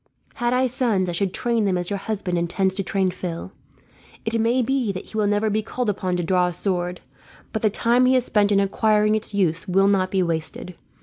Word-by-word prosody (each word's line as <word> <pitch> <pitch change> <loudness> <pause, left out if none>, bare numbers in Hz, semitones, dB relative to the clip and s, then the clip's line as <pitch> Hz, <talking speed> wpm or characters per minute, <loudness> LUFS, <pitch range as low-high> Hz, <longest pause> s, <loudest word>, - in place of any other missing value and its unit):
"Had 240 0 -1
I 255 +1 +2
sons, 230 -7 0
I - - -1
should 185 +2 -1
train 235 +1 0
them 190 -2 +1
as 175 +2 -3
your 200 - -1
husband 195 -3 -3
intends 175 +3 0
to 195 - -3
train 190 -1 0
Phil. 180 0 -6 0.7
It 225 0 0
may 240 +3 +2
be 255 -3 0
that 185 - -6
he - - -13
will 210 -1 +2
never 205 +1 +1
be 215 +1 +1
called 230 +1 -2
upon 185 -2 -2
to 175 - -1
draw 180 +1 +2
a 175 - -3
sword, 180 -1 -2 0.5
but 220 - -2
the 215 - +3
time 240 +4 +2
he 260 - +4
has 250 -1 +2
spent 210 -3 +2
in 200 - +4
acquiring 210 +2 +2
its 215 -1 -2
use 165 -4 0
will 195 +2 +3
not 190 -2 +2
be 190 -1 +1
wasted. 165 +2 -3
200 Hz, 230 wpm, -23 LUFS, 180-220 Hz, 0.7 s, he